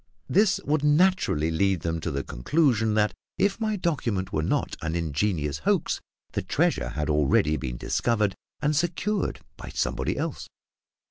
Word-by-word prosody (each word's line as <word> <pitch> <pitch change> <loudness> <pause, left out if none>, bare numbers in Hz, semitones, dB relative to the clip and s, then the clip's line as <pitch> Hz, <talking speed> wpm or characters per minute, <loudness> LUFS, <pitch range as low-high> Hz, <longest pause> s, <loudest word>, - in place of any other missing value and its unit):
This 195 0 +3
would 150 0 +1
naturally 150 - +3
lead 95 +1 +1
them 80 0 -1
to 80 - -3
the 70 -2 -2
conclusion 110 - +1
that, 105 0 +2 0.2
if 195 +3 +1
my 215 -1 0
document 120 - -1
were 75 - +1
not 80 - 0
an 80 +1 -2
ingenious 80 -2 -1
hoax, - - 0 0.3
the - - -1
treasure - - +1
had 75 +3 -3
already 75 0 +3
been 60 -5 -4
discovered 105 - +1 0.3
and 150 +1 +2
secured 175 +6 -1 0.2
by - - -8
somebody - - -1
else. - - -4
100 Hz, 150 wpm, -26 LUFS, -, 0.3 s, This